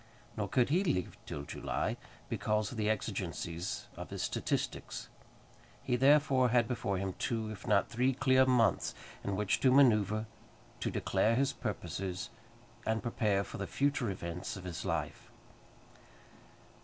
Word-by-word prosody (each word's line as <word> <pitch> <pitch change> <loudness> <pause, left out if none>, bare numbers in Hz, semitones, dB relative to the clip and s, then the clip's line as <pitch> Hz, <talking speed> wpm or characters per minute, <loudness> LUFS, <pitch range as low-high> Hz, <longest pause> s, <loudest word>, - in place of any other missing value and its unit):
Nor 105 -2 -1
could 125 +4 +2
he 175 +6 +3
leave 140 - -1
till 70 - -4
July, - - -2 0.3
because 105 -1 0
of 125 - -7
the 105 0 +1
exigencies 90 -4 -3
of - - -7
his - - -4
statistics. - - -2 0.7
He 125 - +1
therefore 135 -1 +5
had 120 -1 +3
before 110 -5 -1
him 95 0 -2
two, 110 -2 -1
if 105 +1 -9
not 105 -3 +4
three, 125 +3 +1
clear 130 0 +4
months 115 -7 +3 0.3
in 100 - -1
which 105 0 +1
to 130 - +4
manoeuvre, 110 -5 +4 0.5
to - - -1
declare 105 +4 +2
his 135 +2 +2
purposes, 95 +3 -4 0.5
and 110 -2 0
prepare 105 -4 +1
for - - -8
the 100 - -3
future 140 -5 +1
events 90 0 -4
of 95 - -8
his 90 -3 -5
life. - - -3
110 Hz, 145 wpm, -33 LUFS, 100-125 Hz, 0.7 s, therefore